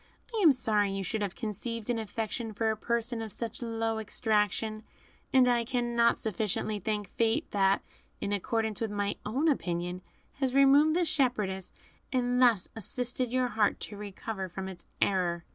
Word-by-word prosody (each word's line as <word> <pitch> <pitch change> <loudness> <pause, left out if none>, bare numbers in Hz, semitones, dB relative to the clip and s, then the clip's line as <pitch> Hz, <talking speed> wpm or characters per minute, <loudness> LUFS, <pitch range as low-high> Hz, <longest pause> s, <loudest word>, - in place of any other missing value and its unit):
I 445 - 0
am 330 -6 +8
sorry 210 -6 +1
you 195 0 -2
should 210 +4 -2
have 200 -3 -2
conceived 230 0 -4
an 230 - -1
affection 220 +1 -3
for 220 +1 +1
a - - -1
person 235 +1 -1
of 220 -1 -5
such 230 +3 -5
low 225 -1 -1
extraction, 215 0 0 0.5
and 260 -1 +6
I 240 -1 +3
cannot 235 -1 +2
sufficiently 215 0 -1
thank 210 0 -2
Fate 225 -1 0
that, 195 -1 +3 0.4
in 205 - -2
accordance 220 +2 -1
with 225 - 0
my 205 0 -1
own 270 +9 +1
opinion, 175 - -1 0.4
has 265 -2 0
removed 280 +3 +6
this 350 -1 +2
shepherdess, 210 - 0 0.4
and 250 -1 +1
thus 235 -7 +5
assisted 245 +3 -3
your 255 -1 +1
heart 215 -3 +1
to 210 - -6
recover 200 -1 -5
from 190 +2 -5
its 185 -2 -9
error." 175 -3 +1
220 Hz, 165 wpm, -30 LUFS, 205-245 Hz, 0.5 s, am